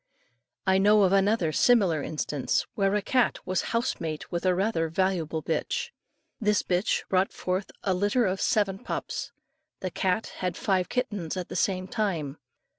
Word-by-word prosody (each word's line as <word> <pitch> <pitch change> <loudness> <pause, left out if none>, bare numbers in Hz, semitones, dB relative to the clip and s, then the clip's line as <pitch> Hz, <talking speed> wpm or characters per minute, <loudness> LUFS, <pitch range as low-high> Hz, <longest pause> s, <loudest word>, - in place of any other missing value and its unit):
I 190 0 +4
know 205 +1 +5
of 190 0 +3
another 195 -4 +3
similar 190 -6 +3
instance, 150 -3 -1
where 195 0 +1
a 210 - 0
cat 255 -2 +2
was 185 -1 0
house 230 +1 0
mate 155 -2 -5
with 175 +2 -1
a 180 - +3
rather 185 -4 0
valuable 165 -3 0
bitch; 165 - -2 0.5
this 210 -2 +2
bitch 180 +2 0
brought 190 0 +2
forth 185 +2 -2
a 190 - +1
litter 205 +6 +2
of 190 0 -1
seven 195 -3 +1
pups. - - -4 0.5
The 185 - -3
cat 190 +5 -1
had 180 -2 -2
five 185 -2 0
kittens 205 -9 -2
at 180 - -4
the - - -6
same 185 -1 0
time. 170 - -2
190 Hz, 165 wpm, -27 LUFS, 175-205 Hz, 0.5 s, know